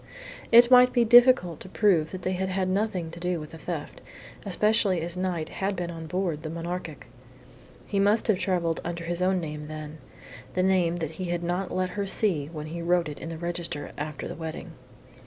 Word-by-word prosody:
It 235 +2 +8
might 250 0 +7
be 240 -2 +3
difficult 240 - +6
to 185 - -10
prove 180 -6 +2
that 185 -1 -7
they 185 - 0
had 190 0 -2
had 185 0 -1
nothing 185 -3 -1
to 170 - -9
do 180 -1 -1
with 150 -1 -9
the 160 - -10
theft, - - -6 0.5
especially 205 -1 +2
as 170 +1 -3
Knight 180 -3 -2
had 195 +1 -2
been 175 -1 -3
on 165 -1 -7
board 175 -3 -2
the 155 - -5
Monarchic. 170 -1 -5 0.8
He 200 - -1
must 205 +3 +3
have 210 -5 +2
travelled 175 -4 0
under 170 0 -4
his 175 +1 -3
own 185 0 +2
name 150 -2 -6
then, 155 0 -8 0.6
the 185 - +2
name 180 -3 +2
that 160 -3 -3
he 180 +3 -6
had 175 0 -2
not 180 +2 -2
let 185 0 -1
her 200 +1 -3
see 190 -8 +1
when 155 -1 -7
he 165 +2 -6
wrote 170 -1 +1
it 145 - -8
in 165 - -6
the 165 - -6
register 170 -3 -4
after 150 0 -5
the - - -5
wedding. 160 -1 -7
175 Hz, 210 wpm, -26 LUFS, 165-190 Hz, 0.8 s, It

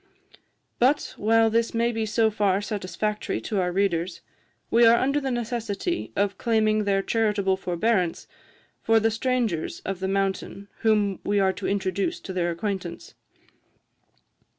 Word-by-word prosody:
"But, 270 +5 +2
while 225 +1 +3
this 230 +1 +1
may 235 +1 +2
be 225 -1 -2
so 220 +1 +2
far 200 -2 +1
satisfactory 210 - -3
to 200 - -2
our 180 0 0
readers, 180 -2 -1 0.5
we 235 +1 +5
are 230 0 +7
under 275 +4 +1
the 270 - -2
necessity 240 - -3
of 200 -1 0
claiming 215 -2 +2
their 195 -1 +1
charitable 210 -4 +1
forbearance 185 0 0 0.6
for 225 0 +4
the 225 +1 +1
strangers 225 -7 -1
of 195 -1 -3
the 190 - -2
mountain 195 0 -2
whom 210 -3 +2
we 205 0 +1
are 190 -1 +2
to 190 +1 -5
introduce 200 - -1
to 190 - -7
their 175 -1 0
acquaintance. 180 0 -4
210 Hz, 145 wpm, -25 LUFS, 190-225 Hz, 0.6 s, are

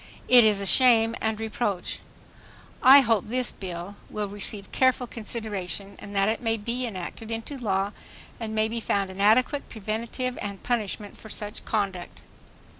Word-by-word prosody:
It 245 -1 +8
is 210 -2 +4
a 200 - -2
shame 230 0 +5
and 220 -1 -1
reproach. 215 -4 -2 0.8
"I 275 +2 +9
hope 225 -6 +1
this 250 +2 +1
bill... 180 +1 -7
will 210 -1 -3
receive 200 0 -3
careful 260 -1 +2
consideration 210 -4 -5
and 205 0 -9
that 195 0 +3
it 220 +2 0
may 225 -1 0
be 240 +4 -2
enacted 210 +2 -7
into 225 +5 -5
law 200 -5 -1 0.5
and 220 -2 -4
may 215 0 +2
be 230 +1 -3
found 200 -3 -1
an 190 +1 -6
adequate 250 +7 +3
preventive 230 +4 -4
and 200 -1 -6
punishment 215 -4 -2
for 220 - -11
such 210 +1 -2
conduct." 195 -5 -3
220 Hz, 160 wpm, -26 LUFS, 200-235 Hz, 0.8 s, I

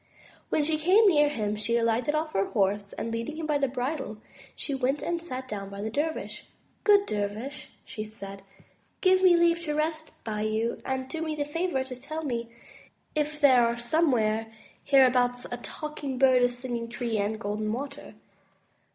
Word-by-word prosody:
When 305 - +2
she 310 +1 0
came 385 +7 +5
near 295 -5 +5
him, 210 -6 -2
she 225 +3 0
alighted 235 +6 +1
off 310 0 -1
her 195 0 +2
horse, 200 -1 0
and 230 - -4
leading 230 +6 -3
him 320 - -3
by 300 -2 +1
the 275 - +2
bridle, 255 -3 -3 0.4
she 285 - -4
went 270 +2 0
and 345 -1 -1
sat 260 -6 -5
down 200 -4 -5
by 200 +1 -6
the 220 - -3
dervish. 310 +5 -3 0.4
Good 405 -1 +6
dervish,'* 215 - -4 0.2
she 230 -5 -5
said, 200 -2 -9 0.6
give 375 0 +5
me 360 -2 +6
leave 340 0 +4
to 300 -1 -1
rest 315 +1 -2
by 210 -2 -3
you; 220 +2 -1
and 265 0 -2
do 320 +4 -5
me 315 -1 -2
the 290 -1 -1
favor 295 -2 -1
to 260 -1 -8
tell 305 +5 -6
me 235 -5 -3 0.6
if 300 0 -1
there 265 -4 +6
are 235 0 +1
somewhere 235 -5 +1 0.3
here 275 -2 +6
abouts 245 -1 +2
a 245 - -2
Talking 285 0 -5
Bird, 260 -1 +5
a 245 - +4
Singing 245 -1 -4
Tree, 235 -2 -2
and 210 +2 -1
Golden 215 0 -2
Water.' 275 0 -6
260 Hz, 185 wpm, -28 LUFS, 225-305 Hz, 0.6 s, Good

